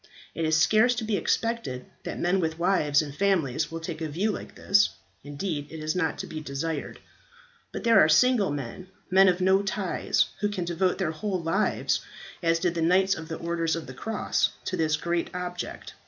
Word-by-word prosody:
It 165 Hz, -, -2 dB
is 160 Hz, 0 st, +3 dB
scarce 220 Hz, +8 st, +4 dB
to 235 Hz, -, -3 dB
be 220 Hz, -1 st, 0 dB
expected 225 Hz, -, -1 dB, 0.2 s
that -, -, -4 dB
men 180 Hz, +2 st, +2 dB
with 160 Hz, -2 st, -1 dB
wives 165 Hz, -5 st, +2 dB
and 145 Hz, -2 st, -7 dB
families 160 Hz, -7 st, +1 dB
will 165 Hz, -, -4 dB
take 160 Hz, -1 st, -6 dB
a 160 Hz, -, -2 dB
view 190 Hz, +9 st, 0 dB
like -, -, -7 dB
this, 205 Hz, +1 st, +3 dB, 0.3 s
indeed 145 Hz, 0 st, -4 dB
it 160 Hz, -, -8 dB
is 155 Hz, +1 st, -2 dB
not 160 Hz, -4 st, 0 dB
to -, -, -5 dB
be 155 Hz, -, -6 dB
desired. 150 Hz, +1 st, -4 dB, 0.7 s
But -, -, -6 dB
there 230 Hz, -1 st, +6 dB
are 155 Hz, -, +3 dB
single 220 Hz, +5 st, +4 dB
men, 145 Hz, +5 st, -5 dB, 0.2 s
men 190 Hz, +1 st, +7 dB
of 180 Hz, 0 st, +2 dB
no 190 Hz, +1 st, +4 dB
ties, 195 Hz, -2 st, 0 dB
who 205 Hz, -, +1 dB
can 185 Hz, -4 st, -3 dB
devote 175 Hz, +2 st, 0 dB
their 155 Hz, -, -1 dB
whole 185 Hz, +4 st, -3 dB
lives, 190 Hz, +6 st, +1 dB, 0.4 s
as 165 Hz, -1 st, +2 dB
did 170 Hz, +1 st, 0 dB
the 170 Hz, -, -2 dB
Knights 190 Hz, +4 st, +4 dB
of 160 Hz, 0 st, -6 dB
the 160 Hz, -, -5 dB
Orders 165 Hz, -1 st, -1 dB
of 165 Hz, -, -5 dB
the 130 Hz, -, -9 dB
Cross, 220 Hz, +12 st, 0 dB, 0.2 s
to 185 Hz, -, -2 dB
this 160 Hz, -2 st, +1 dB
great 170 Hz, 0 st, -1 dB
object. 180 Hz, 0 st, -5 dB
170 Hz, 200 wpm, -27 LUFS, 160-195 Hz, 0.7 s, men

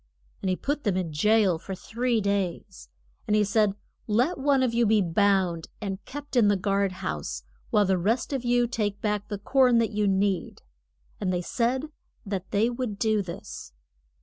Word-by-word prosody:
And 190 Hz, -, -1 dB
he 185 Hz, -, +2 dB
put 290 Hz, +8 st, -3 dB
them 200 Hz, -4 st, +1 dB
in 170 Hz, -4 st, -2 dB
jail 205 Hz, +1 st, +3 dB
for 190 Hz, +3 st, -6 dB
three 235 Hz, +3 st, -1 dB
days. 190 Hz, -, -3 dB, 0.4 s
And 210 Hz, -, +2 dB
he 210 Hz, -, +4 dB
said, 205 Hz, -1 st, +2 dB, 0.3 s
Let 250 Hz, +10 st, +1 dB
one 275 Hz, -1 st, +3 dB
of 245 Hz, -2 st, +1 dB
you 235 Hz, -1 st, +3 dB
be 215 Hz, 0 st, +4 dB
bound, 185 Hz, -2 st, +1 dB
and 195 Hz, -2 st, -5 dB
kept 290 Hz, 0 st, -8 dB
in 235 Hz, -4 st, +5 dB
the 205 Hz, -, +4 dB
guard 195 Hz, 0 st, +1 dB
house, 65 Hz, -5 st, -4 dB, 0.3 s
while 210 Hz, -, +3 dB
the 190 Hz, -1 st, +1 dB
rest 230 Hz, +9 st, 0 dB
of 265 Hz, -3 st, -2 dB
you 245 Hz, 0 st, +3 dB
take 210 Hz, -4 st, -2 dB
back 210 Hz, -1 st, -1 dB
the 205 Hz, -, -4 dB
corn 250 Hz, +3 st, +3 dB
that 230 Hz, -1 st, +2 dB
you 210 Hz, -1 st, 0 dB
need. 195 Hz, -1 st, 0 dB, 0.6 s
And 185 Hz, -, -1 dB
they 180 Hz, -1 st, -1 dB
said 250 Hz, +7 st, 0 dB, 0.4 s
that 195 Hz, -2 st, -4 dB
they 210 Hz, +2 st, +2 dB
would 240 Hz, -4 st, -3 dB
do 215 Hz, -1 st, +2 dB
this. 170 Hz, -, -8 dB
205 Hz, 185 wpm, -26 LUFS, 190-235 Hz, 0.6 s, in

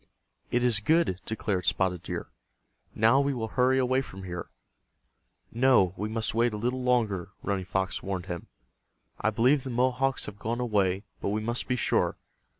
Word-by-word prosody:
"It 120 Hz, 0 st, +1 dB
is 120 Hz, -4 st, +4 dB
good," 155 Hz, -, +2 dB
declared 105 Hz, -5 st, -2 dB
Spotted 90 Hz, -2 st, +1 dB
Deer. -, -, -5 dB, 0.6 s
"Now 115 Hz, +5 st, +5 dB
we 140 Hz, -1 st, 0 dB
will 110 Hz, -2 st, -3 dB
hurry 130 Hz, +2 st, +3 dB
away 130 Hz, 0 st, +2 dB
from 95 Hz, -7 st, -10 dB
here," 90 Hz, -2 st, -6 dB, 1.0 s
"No, 120 Hz, -7 st, +4 dB
we 105 Hz, +1 st, -3 dB
must 110 Hz, 0 st, -2 dB
wait 115 Hz, 0 st, +2 dB
a -, -, -3 dB
little 125 Hz, +4 st, -1 dB
longer," 115 Hz, -8 st, +1 dB
Running 95 Hz, -2 st, -1 dB
Fox 95 Hz, +1 st, -2 dB
warned 95 Hz, -2 st, -3 dB
him. 90 Hz, -2 st, -6 dB, 0.7 s
"I -, -, +2 dB
believe 125 Hz, +6 st, +3 dB
the 130 Hz, -, -6 dB
Mohawks 130 Hz, +2 st, +1 dB
have 105 Hz, -1 st, -8 dB
gone 115 Hz, +3 st, -2 dB
away, 100 Hz, -5 st, +1 dB, 0.2 s
but -, -, -1 dB
we 105 Hz, +2 st, 0 dB
must 120 Hz, +2 st, -1 dB
be 125 Hz, -, +1 dB
sure. -, -, +1 dB
110 Hz, 170 wpm, -28 LUFS, 95-125 Hz, 1.0 s, Now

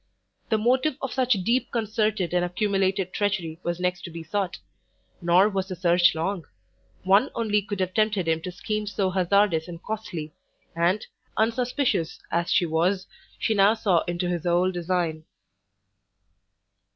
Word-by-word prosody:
The 220 Hz, -, +3 dB
motive 255 Hz, +6 st, +2 dB
of 270 Hz, -, -4 dB
such 255 Hz, -1 st, +3 dB
deep 240 Hz, +5 st, +1 dB
concerted 215 Hz, -5 st, 0 dB
and 175 Hz, 0 st, +2 dB
accumulated 195 Hz, 0 st, 0 dB
treachery 185 Hz, -6 st, -1 dB
was 175 Hz, -1 st, -3 dB
next 180 Hz, 0 st, -1 dB
to -, -, -6 dB
be 165 Hz, 0 st, -8 dB
sought: 190 Hz, +2 st, -2 dB, 0.6 s
nor 175 Hz, +3 st, +5 dB
was 195 Hz, -2 st, -2 dB
the 185 Hz, -, -5 dB
search 175 Hz, -1 st, +4 dB
long; 170 Hz, +2 st, -2 dB, 0.6 s
one 200 Hz, +8 st, +4 dB
only 210 Hz, -3 st, +1 dB
could 205 Hz, -1 st, -5 dB
have 185 Hz, 0 st, -1 dB
tempted 215 Hz, -4 st, +1 dB
him 160 Hz, 0 st, +1 dB
to 180 Hz, -, -5 dB
schemes 210 Hz, +3 st, -3 dB
so 190 Hz, -3 st, +1 dB
hazardous 185 Hz, -2 st, +2 dB
and 170 Hz, -1 st, -8 dB
costly; 175 Hz, -8 st, -5 dB, 0.4 s
and, 175 Hz, +5 st, +1 dB, 0.3 s
unsuspicious 240 Hz, -, 0 dB
as 170 Hz, 0 st, 0 dB
she 175 Hz, -, +4 dB
was, 175 Hz, +4 st, +1 dB, 0.3 s
she 220 Hz, -, 0 dB
now 205 Hz, +1 st, +5 dB
saw 195 Hz, -7 st, +2 dB
into 175 Hz, +1 st, -1 dB
his 175 Hz, -2 st, -2 dB
whole 175 Hz, +1 st, +2 dB
design. 175 Hz, -3 st, -1 dB
185 Hz, 150 wpm, -25 LUFS, 175-215 Hz, 0.6 s, nor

